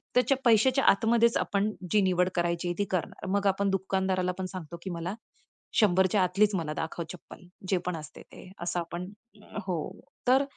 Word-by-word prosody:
त्याच्या 250 +2 +4
पैशाच्या 250 +4 +5
आतमध्येच 230 +3 +3
आपण, 205 +1 0 0.2
जी 210 - +4
निवड 180 -1 +2
करायची 175 0 0
आहे 175 - -2
ती 205 - +2
करणार. 180 0 -3
मग 200 0 +2
आपण 195 +1 +2
दुकानदाराला 190 -1 0
पण 185 - -2
सांगतो 170 -2 -7
की 190 - -4
मला 170 +2 -3 0.7
100च्या 190 0 +4
आतलीच 200 +3 +2
मला 160 -4 -2
दाखव 165 +2 -4
चप्पल. 180 +1 -12 0.2
जे 190 - +3
पण 180 -1 -1
असते 155 -1 -10
ते 185 - -14
असं 175 0 -1
आपण 175 +2 -5 0.6
हो 175 -3 0 0.5
तर 265 +3 +5
185 Hz, 170 wpm, -28 LUFS, 175-205 Hz, 0.7 s, पैशाच्या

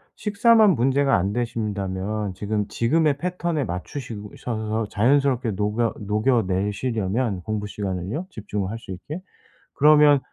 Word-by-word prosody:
식사만 220 0 +4
문제가 135 +3 +2
안 95 +2 -1
되신다면 105 -3 -2
지금 105 +1 -2
지금의 150 +4 +1
패턴에 175 -2 -2
맞추시 110 +4 -5 0.2
셔서 110 -1 -2
자연스럽게 130 +1 +2
녹여 105 +3 0
녹여 105 +4 +1
내시려면 100 +2 -1
공부 105 0 -3
시간을요 100 - -4
집중을 105 - -4
할 115 - -4
수 115 - -10
있게. 145 - -7 0.5
그러면 150 -1 +6
115 Hz, 310 characters per minute, -23 LUFS, 105-140 Hz, 0.5 s, 그러면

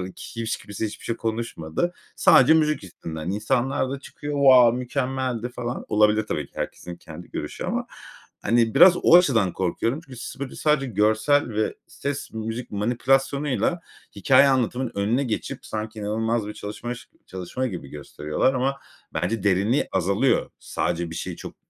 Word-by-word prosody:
Kims 115 -1 -6
hiç - - -1
kimse 105 +2 -5
hiçbir 105 - -10
şey 115 - -1
konuşmadı. 115 - -2 0.2
Sadece 135 +5 +6
müzik 155 -4 +2
yüzünden. 80 -3 -7
İnsanlar 125 +6 0
da 140 +1 -4
çıkıyor, 145 +1 -7
wow, 130 -4 +6
mükemmeldi 125 -2 -2
falan. 120 0 -5
Olabilir, 105 0 +3
tabii 75 -7 -2
ki, - - -35
herkesin 90 -1 -5
kendi 85 +1 -12
görüşü - - -5
ama. - - -2 0.6
Hani, 115 0 +2
biraz 180 -1 +8
o - - +7
açıdan 115 - +3
korkuyorum 115 - -1
çünkü 130 -4 -11
s - - -8
böyle, 140 -1 -5
sadece 150 -2 +1
görsel 110 +6 +2
ve 110 -1 -1
ses, 140 0 -5
müzik 110 +2 -5
manipülasyonuyla 135 - +1 0.4
hikâye 135 0 +5
anlatımının 130 -1 0
önüne 110 +7 +1
geçip 115 -5 -4
sanki 110 0 -5
inanılmaz 110 +1 -1
bir 105 - -6
çalışmaş 120 +4 -7 0.2
çalışma 95 +8 -4
gibi 90 - -6
gösteriyorlar 75 - -1
ama 135 +2 0 0.4
bence 115 -4 -1
derinliği 100 +7 +2
azalıyor. 100 +8 +1
Sadece 85 -1 -2
bir - - -6
şeyi - - -4
çok, - - -9
115 Hz, 150 wpm, -24 LUFS, 105-135 Hz, 0.6 s, biraz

